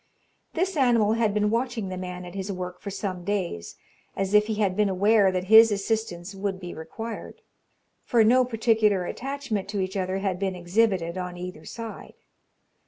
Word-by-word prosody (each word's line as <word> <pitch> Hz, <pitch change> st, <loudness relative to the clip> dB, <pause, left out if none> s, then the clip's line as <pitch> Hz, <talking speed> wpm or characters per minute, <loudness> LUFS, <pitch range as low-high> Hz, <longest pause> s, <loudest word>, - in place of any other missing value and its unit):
This 370 Hz, +3 st, 0 dB
animal 235 Hz, -6 st, +3 dB
had 225 Hz, -2 st, +2 dB
been 210 Hz, 0 st, +1 dB
watching 230 Hz, -4 st, -1 dB
the 185 Hz, -, -4 dB
man 180 Hz, 0 st, -6 dB
at 175 Hz, -, -9 dB
his 195 Hz, +1 st, -4 dB
work 180 Hz, -1 st, -6 dB
for 200 Hz, -, -5 dB
some 190 Hz, -2 st, -4 dB
days, 175 Hz, -, -3 dB, 0.4 s
as 195 Hz, +1 st, -2 dB
if 210 Hz, 0 st, +5 dB
he 220 Hz, -, -1 dB
had 200 Hz, -3 st, +1 dB
been 210 Hz, 0 st, +2 dB
aware 200 Hz, +1 st, +4 dB
that 185 Hz, -1 st, -1 dB
his 220 Hz, +3 st, +8 dB
assistance 200 Hz, -3 st, -2 dB
would 195 Hz, -1 st, -3 dB
be 175 Hz, -2 st, -7 dB
required; 225 Hz, +8 st, -7 dB, 0.6 s
for 235 Hz, -2 st, +3 dB
no 250 Hz, +4 st, +5 dB
particular 220 Hz, -5 st, +2 dB
attachment 265 Hz, -5 st, -4 dB
to 205 Hz, -1 st, -2 dB
each 190 Hz, 0 st, -2 dB
other 190 Hz, 0 st, -1 dB
had 195 Hz, -2 st, -2 dB
been 190 Hz, -1 st, -1 dB
exhibited 180 Hz, -1 st, +1 dB
on 180 Hz, -1 st, -5 dB
either 180 Hz, -3 st, -7 dB
side. 230 Hz, -1 st, -8 dB
200 Hz, 175 wpm, -26 LUFS, 185-225 Hz, 0.6 s, his